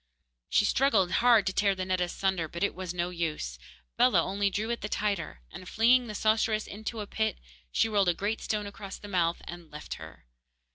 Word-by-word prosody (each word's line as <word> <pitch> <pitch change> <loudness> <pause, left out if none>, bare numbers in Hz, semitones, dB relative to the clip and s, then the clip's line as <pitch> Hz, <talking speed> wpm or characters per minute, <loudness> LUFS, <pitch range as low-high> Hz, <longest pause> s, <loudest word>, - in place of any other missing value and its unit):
She 205 - +4
struggled 210 -8 +3
hard 230 -3 +5
to 190 - 0
tear 200 -1 +2
the 185 0 -3
net 185 -1 0
asunder, 180 -1 0
but 170 +4 -4
it 200 - +1
was 185 -1 -5
no 175 0 -2
use. 155 - -3 0.4
Bellah - - +5
only 200 +1 0
drew 215 +4 -2
it 235 - -3
the 210 - -4
tighter, 200 - -2
and, 185 - -9
flinging 245 +2 +4
the 215 - -6
sorceress 215 0 +2
into 220 +2 -5
a - - -4
pit, 220 +2 -1 0.3
she - - +2
rolled 200 -4 +2
a 175 - +2
great 210 +5 -2
stone 210 -1 -2
across 200 -1 -8
the 205 - -10
mouth, 175 -4 0
and 175 -2 -9
left 150 0 -7
her. 80 -5 -11
200 Hz, 205 wpm, -29 LUFS, 175-215 Hz, 0.4 s, hard